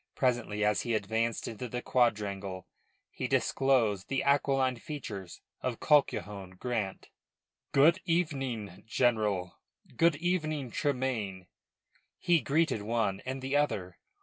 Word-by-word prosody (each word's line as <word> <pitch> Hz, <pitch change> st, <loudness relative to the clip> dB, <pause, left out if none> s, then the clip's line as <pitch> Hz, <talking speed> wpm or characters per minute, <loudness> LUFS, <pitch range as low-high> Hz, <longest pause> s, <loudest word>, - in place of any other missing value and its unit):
Presently, 120 Hz, -5 st, +1 dB
as 105 Hz, -2 st, +2 dB
he 120 Hz, -2 st, -1 dB
advanced 110 Hz, +2 st, -1 dB
into 115 Hz, +2 st, -5 dB
the 125 Hz, +1 st, -4 dB
quadrangle, 100 Hz, -6 st, 0 dB, 0.5 s
he -, -, -3 dB
disclosed 115 Hz, -8 st, +2 dB
the 135 Hz, -, 0 dB
aquiline 135 Hz, -2 st, +2 dB
features 110 Hz, -, -7 dB, 0.2 s
of 125 Hz, -3 st, -2 dB
Colquhoun 100 Hz, -, +1 dB
Grant. 110 Hz, -4 st, -3 dB, 0.6 s
"Good 160 Hz, +7 st, +5 dB
evening, 135 Hz, -, -1 dB
General. 110 Hz, -6 st, +1 dB, 0.4 s
Good 170 Hz, -2 st, +4 dB
evening, 155 Hz, -5 st, -1 dB
Tremayne," 125 Hz, -10 st, -1 dB, 0.7 s
he 170 Hz, -3 st, +3 dB
greeted 155 Hz, -6 st, +1 dB
one 105 Hz, -3 st, 0 dB
and 130 Hz, 0 st, -4 dB
the 135 Hz, +2 st, -1 dB
other. 95 Hz, -, 0 dB
120 Hz, 115 wpm, -30 LUFS, 105-140 Hz, 0.7 s, Good